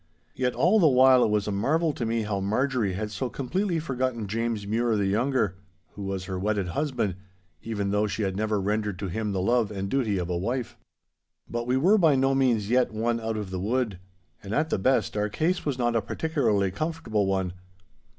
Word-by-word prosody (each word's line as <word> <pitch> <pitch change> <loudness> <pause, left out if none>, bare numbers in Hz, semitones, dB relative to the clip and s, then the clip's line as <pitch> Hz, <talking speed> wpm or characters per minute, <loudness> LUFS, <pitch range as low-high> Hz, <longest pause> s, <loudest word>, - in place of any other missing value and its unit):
Yet 125 -1 -1
all 210 +6 +4
the 170 - +6
while 130 -2 +6
it - - +2
was 105 0 0
a - - -1
marvel 155 +11 +1
to 120 -4 -3
me 115 0 0
how 105 -2 -2
Marjorie 110 +1 0
had 105 +3 -4
so 110 +5 -3
completely 175 +9 -1
forgotten 130 -7 -2
James 115 0 -2
Mure 115 +2 +1
the 100 -2 +1
younger, 105 -1 +1 0.3
who 100 - -10
was 95 -1 -3
her 95 -1 -4
wedded 100 -2 -1
husband, 120 - -1 0.5
even 100 -3 -2
though 105 +1 +2
she 105 +1 -2
had 95 -1 -1
never 105 0 0
rendered 105 0 -1
to 100 0 -4
him 105 +3 -2
the 95 - -1
love 115 0 +2
and 100 -2 -4
duty 115 -7 +1
of 90 -2 -2
a 90 - -2
wife. 120 +7 -2 0.7
But 120 0 -4
we 125 +1 +2
were 190 +10 +4
by 160 -6 +5
no 135 +1 +2
means 125 -6 +2
yet 125 -1 +3
won 115 +2 -1
out 110 -1 -3
of 105 -3 -5
the 95 - -3
wood. 110 -1 -1 0.4
And, 100 +1 -4
at 155 +1 0
the - - +1
best, 130 +3 +1
our 105 0 0
case 165 - -1
was 140 -3 -1
not 120 -1 0
a 115 - +3
particularly 105 - 0
comfortable 135 - -1
one. 95 -2 -1
110 Hz, 210 wpm, -26 LUFS, 100-130 Hz, 0.7 s, the